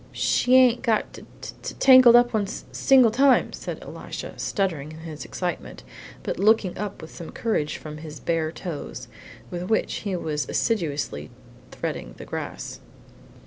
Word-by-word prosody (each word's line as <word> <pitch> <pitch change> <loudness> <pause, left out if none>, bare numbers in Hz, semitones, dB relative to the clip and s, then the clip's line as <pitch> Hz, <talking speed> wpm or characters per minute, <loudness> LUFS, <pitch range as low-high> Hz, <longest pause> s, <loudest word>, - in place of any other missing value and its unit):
"She 250 +1 +2
ain't 250 -2 +6
got 225 -4 0
t - - -11 0.2
t - - -7
tangled 255 -3 +8
up 240 0 +5
one 210 -2 +1
s 195 - -7
single 260 -4 +5
time," 270 +3 +4
said - - -6
Elisha, - - -7
stuttering 165 -8 -2
in 160 - -11
his 155 -2 -7
excitement, 175 -2 -5 0.4
but - - -3
looking 210 -2 +3
up 205 -3 -5
with 160 - -10
some 170 - -8
courage 185 -10 -1
from 150 -1 -8
his 155 -1 -9
bare 165 -2 -1
toes, 155 - -7 0.4
with 175 +1 -5
which 220 - +1
he 200 -3 -3
was 155 -4 -3
assiduously 150 - -1 0.4
threading - - -5
the - - -9
grass. - - -6
185 Hz, 155 wpm, -24 LUFS, 155-230 Hz, 0.4 s, tangled